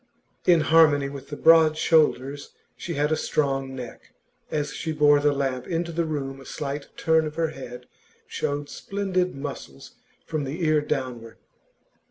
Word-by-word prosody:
In 170 -3 +6
harmony 150 -3 +4
with 140 -1 -9
the 145 - -5
broad 160 -1 +6
shoulders, 145 -4 +1 0.2
she 170 - -5
had 150 +2 +1
a - - +3
strong 135 -3 -1
neck; 125 -3 -10 0.3
as 150 -1 -2
she 160 - -4
bore 145 -1 +5
the 145 0 +3
lamp 135 -3 -2
into 170 0 -2
the 170 0 -1
room 135 -3 -4
a - - -13
slight 145 0 -5
turn 160 -1 +2
of 150 - -8
her 165 -1 0
head 125 -4 -9 0.4
showed 145 0 -3
splendid 185 -2 -2
muscles 135 - -8 0.3
from 155 -2 -3
the 155 +6 -3
ear 155 -1 +3
downward. 125 -5 -4
145 Hz, 160 wpm, -25 LUFS, 135-160 Hz, 0.4 s, In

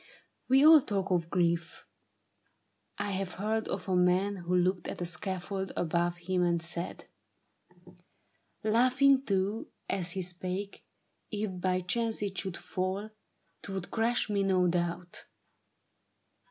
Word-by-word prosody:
We 270 +3 +6
all 315 -1 +9
talk 195 -5 -2
of 170 -2 +1
grief. 170 -2 0 1.1
I 205 - -2
have 190 -1 -3
heard 220 +3 -1
of - - -4
a 185 - +1
man 180 +3 +2
Who 180 0 -1
looked 180 0 +1
at - - -5
a 175 - -2
scaffold 190 +2 -2
above 175 +1 0
him 180 +1 -1
and 170 -1 +2
said 170 +1 -3 0.8
— 180 0 -26
Laughing 255 +5 +4
too 200 -1 -1 0.2
as 180 -3 -1
he 190 - -2
spake 185 +3 -4 0.2
— - - -46
' - - -47
If 205 -4 -3
by 185 0 +1
chance 225 +4 -1
it 195 -1 -3
should 190 -3 -3
fall, 190 +3 -3 0.5
'Twould 190 -2 -5
crush 230 +1 +1
me, 205 -2 0
no 185 -2 +3
doubt.' 175 0 -2
185 Hz, 140 wpm, -30 LUFS, 175-205 Hz, 1.1 s, all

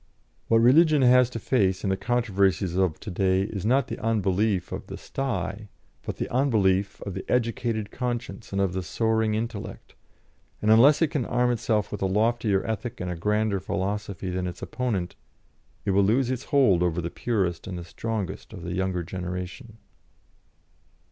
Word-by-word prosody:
What 115 - +4
Religion 145 +5 +5
has 125 0 +6
to 125 - -6
face 100 -5 +1
in 100 - +1
the - - +2
controversies 100 -5 +1
of 95 -4 +1
to 105 - -6
day 95 +1 +2
is 100 0 -4
not 135 +4 +3
the - - -5
unbelief 100 -3 +1
of - - -6
the - - -7
sty, 105 -6 -4 0.3
but - - -6
the - - -2
unbelief 100 -7 +1
of 100 - -5
the 95 - -5
educated 115 -3 0
conscience 120 -6 -4
and 100 - -1
of 95 -2 +1
the 95 - -2
soaring 110 +3 0
intellect; 115 -1 -5 0.7
and 105 - +2
unless 140 +8 +6
it 155 - +1
can 140 -7 -1
arm 125 0 +2
itself 110 -2 0
with 105 - -5
a 95 - +2
loftier 105 0 +1
ethic 110 +1 -4
and 90 0 -3
a - - -3
grander 105 +3 0
philosophy 100 0 -3
than 90 0 -2
its 90 0 -7
opponent, 105 -9 -2 0.7
it - - +1
will 100 +1 +4
lose 120 +5 +2
its 130 0 -4
hold 115 -12 +4
over 90 -1 +1
the 85 0 -3
purest 95 -9 -1
and 95 -2 -5
the 85 - -6
strongest 105 +1 -5
of 95 -5 -8
the 85 0 -4
younger 95 -1 -1
generation. 90 - -6
105 Hz, 175 wpm, -26 LUFS, 95-120 Hz, 0.7 s, has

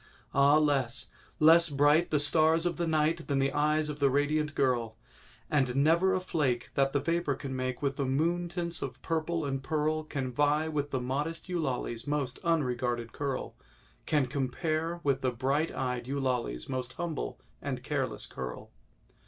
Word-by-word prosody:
Ah, 140 +2 +5
less—less 155 +4 +2
bright 145 +4 +4
The 150 - +2
stars 160 +3 +3
of 175 - 0
the 170 -1 -1
night 160 +1 +1
Than 140 - 0
the 135 0 +1
eyes 150 +1 +2
of 150 -1 -5
the 140 -1 +4
radiant 145 +2 +1
girl! 120 -4 0 0.5
And 130 -4 +1
never 170 +7 +4
a - - +1
flake 145 -9 -1
That 135 0 +2
the 140 - +1
vapour 165 -1 0
can 135 0 -5
make 130 +1 -3
With 140 -1 0
the 140 - 0
moon 170 +6 0
tints 170 -1 -3
of 130 -1 -5
purple 165 0 -1
and 135 -1 -2
pearl, 155 +2 0
Can 135 -4 -4
vie 145 +4 +2
with 145 -2 -2
the 130 - -1
modest 145 +8 -3
Eulalie's 135 -8 -2
most 145 -3 -2
unregarded 125 -7 0
curl— 140 -2 -3 0.5
Can 145 -3 +3
compare 155 +5 -2
with 140 -2 +1
the 130 - +1
bright 135 +6 0
eyed 125 -2 -3
Eulalie's 130 - -2
most 130 -1 -4
humble 170 -4 -4 0.2
and - - -4
careless - - -2
curl. 65 -1 -7
145 Hz, 165 wpm, -30 LUFS, 130-160 Hz, 0.5 s, Ah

